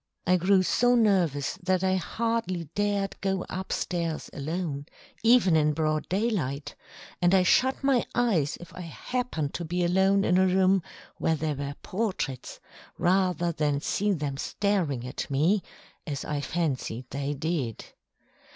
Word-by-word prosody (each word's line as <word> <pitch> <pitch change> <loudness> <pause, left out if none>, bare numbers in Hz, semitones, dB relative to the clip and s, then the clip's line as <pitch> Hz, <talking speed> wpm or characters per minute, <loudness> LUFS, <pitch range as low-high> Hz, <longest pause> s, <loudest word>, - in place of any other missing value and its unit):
I 180 - +4
grew 185 +2 +4
so 245 +6 +3
nervous 180 - +2
that 185 0 +1
I 190 0 +2
hardly 225 -2 -1
dared 205 -1 0
go 190 -1 -1
up 190 +1 -5
stairs 170 -3 -2
alone, 150 -1 -3 0.3
even 225 -7 +5
in 150 -1 +3
broad 155 0 -1
daylight, 180 - -1 0.5
and 175 +2 +4
I 185 - +5
shut 260 +9 +3
my 270 -3 +3
eyes 190 - +1
if 175 0 -12
I 180 - -8
happened 170 - -3
to 175 - -4
be 175 +2 -1
alone 190 +3 +3
in 180 +1 +3
a 190 - +4
room 190 +1 +3 0.4
where 160 - +1
there 155 0 -1
were 140 0 -5
portraits, 185 - -3 0.4
rather 180 -1 +2
than 150 -3 0
see 205 +7 0
them 145 -6 -2
staring 165 -9 -1
at 125 - -5
me, 160 +9 +2 0.5
as 140 -3 -4
I 145 -1 -2
fancied 140 -7 -2
they 140 +1 -2
did. 140 -6 -2
175 Hz, 150 wpm, -27 LUFS, 150-195 Hz, 0.5 s, even